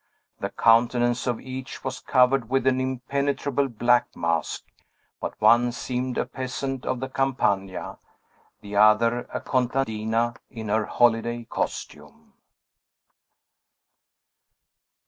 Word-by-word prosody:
The - - -3
countenance 120 +2 +3
of 120 -2 0
each 130 0 -8
was 130 -1 -4
covered 125 -2 +2
with 135 -1 +1
an 130 0 +2
impenetrable 140 +2 -1
black 120 0 +2
mask; 85 -1 -1 0.6
but - - -5
one 120 +1 +5
seemed 125 +1 -3
a - - +1
peasant 130 +1 -5
of 130 - -1
the 130 - -3
Campagna; 110 -8 -1 0.6
the 100 -1 -5
other, 115 +3 +4
a - - -3
contadina 120 -3 0
in 110 -4 -7
her 110 +1 +1
holiday 120 0 +2
costume. - - -6
120 Hz, 105 wpm, -25 LUFS, 115-130 Hz, 0.6 s, one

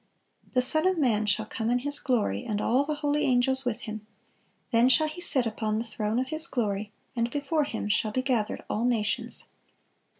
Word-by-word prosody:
(456) - - -27
"The 250 0 +3
Son 315 +3 +2
of 375 -1 +1
man 225 -8 +1
shall 215 +1 +1
come 220 +1 -3
in 245 - +2
His 285 +3 +1
glory, 215 - -1
and 205 -1 -3
all 250 +6 +2
the 300 +1 -3
holy 290 +1 +1
angels 260 +1 +2
with 245 -1 -2
Him. 215 -1 -7 0.6
Then 235 +2 +4
shall 310 +4 +3
He 310 +3 -7
sit 270 -7 +4
upon 215 -1 -2
the 225 - -1
throne 220 -1 -3
of 260 +1 -1
His 315 +2 +6
glory: 210 -5 -2 0.2
and 235 0 0
before 290 +3 -1
Him 225 -6 -4
shall 215 +1 +1
be 255 +4 -1
gathered 240 -6 -1
all 220 - -2
nations." 230 -4 -1
245 Hz, 205 wpm, -27 LUFS, 215-275 Hz, 0.6 s, His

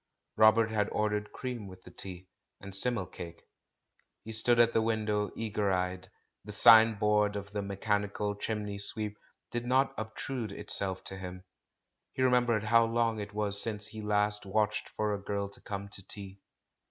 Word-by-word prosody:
Robert 110 +1 +4
had 105 -1 0
ordered 105 -1 -2
cream 120 -5 -6
with 95 -1 -13
the - - -14
tea, 95 -1 -9 0.3
and 100 0 -10
simnel 110 -1 +3
cake. 85 -1 -10 0.8
He 110 - -8
stood 115 +2 +3
at 115 0 +4
the 115 - +2
window 110 -2 -1
eager 105 -3 -1
eyed; 90 0 -2 0.3
the 105 - -9
sign 110 +2 +7
board 105 -1 +1
of 100 0 -6
the 105 0 -3
"mechanical 105 +1 -2
chimney 105 -1 -4
sweep" 105 +1 -5 0.4
did 120 0 -3
not 130 +2 +2
obtrude 110 0 -5
itself 95 -2 0
to 95 - -4
him. 90 -1 -8 0.7
He 130 - -1
remembered 120 -4 +2
how 115 +1 +4
long 115 -1 0
it 105 0 -7
was 105 -1 +8
since 105 -2 +2
he 110 - -8
last 105 0 0
watched 105 +2 -1
for 105 -1 -2
a 100 - -4
girl 100 0 -3
to 100 - -12
come 100 -1 -6
to 95 -2 -9
tea. 100 -1 -8
105 Hz, 170 wpm, -30 LUFS, 100-110 Hz, 0.8 s, was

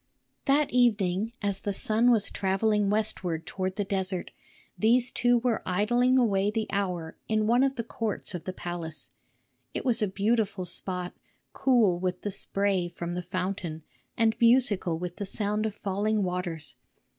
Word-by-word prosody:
That 285 +1 +3
evening, 215 -4 +2
as 200 -1 0
the 200 -1 -3
sun 225 +5 +3
was 225 -4 +3
travelling 205 +1 +1
westward 185 -6 0
toward 190 -1 -3
the 205 - 0
desert, 190 -2 -2 0.4
these 245 +3 +3
two 245 0 +3
were 235 -1 0
idling 240 +7 +2
away 205 -5 +3
the 220 0 -1
hour 180 -5 -2
in 215 -1 +1
one 240 +3 +4
of 270 0 +2
the 235 - -2
courts 225 -3 -3
of 175 - -6
the 185 - -2
palace. 175 -3 -6 0.6
It - - -3
was 245 -4 +2
a 210 - +2
beautiful 205 -1 0
spot, 180 0 -4 0.4
cool 230 -10 +3
with 180 0 -2
the 205 - -2
spray 195 -2 0
from 175 0 -5
the 180 - -2
fountain 180 -3 -4 0.3
and 225 -1 +3
musical 230 -8 +3
with 175 +1 -5
the 200 - -3
sound 210 +2 -1
of 210 - -6
falling 210 +1 0
waters. 175 -6 -4
200 Hz, 160 wpm, -28 LUFS, 180-225 Hz, 0.6 s, one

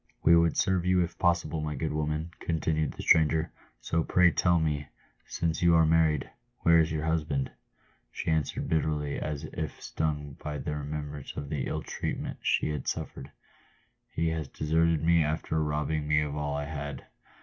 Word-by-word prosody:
" - - -42
"We 85 - +7
would 85 -1 +3
serve 95 -2 +2
you 90 0 +3
if 85 0 -6
possible, 85 -2 +1
my 75 -1 -3
good 75 +3 -2
woman," 75 +2 -2
continued 80 -2 -1
the - - -7
stranger; 80 0 +4 0.3
"so 80 0 0
pray 90 +1 +4
tell 85 +2 +3
me, 75 -3 -1 0.4
since 80 -2 -1
you 85 -1 +5
are 80 -1 +6
married, 80 -3 +3 0.3
where 85 0 +6
is 80 0 +2
your 80 0 -2
husband 75 -4 0 0.3
?" - - -37
She - - -2
answered 80 -3 -1
bitterly, 75 -2 0
as 75 -2 -4
if 80 -3 -5
stung 75 -3 -3
by 75 -1 -3
the 75 +2 -3
remembrance 75 -1 -5
of 70 - -5
the 70 -4 -2
ill - - -3
treatment - - -4
she - - +1
had 75 - -4
suffered, - - -4 0.4
" - - -40
He 80 0 +1
has 80 -3 -2
deserted 80 +2 +1
me 85 0 +4
after 80 +1 -1
robbing 75 0 -1
me 75 0 +3
of 75 -1 -3
all 75 -1 -2
I 75 - -3
had." 75 -2 -6
80 Hz, 185 wpm, -29 LUFS, 75-80 Hz, 0.4 s, We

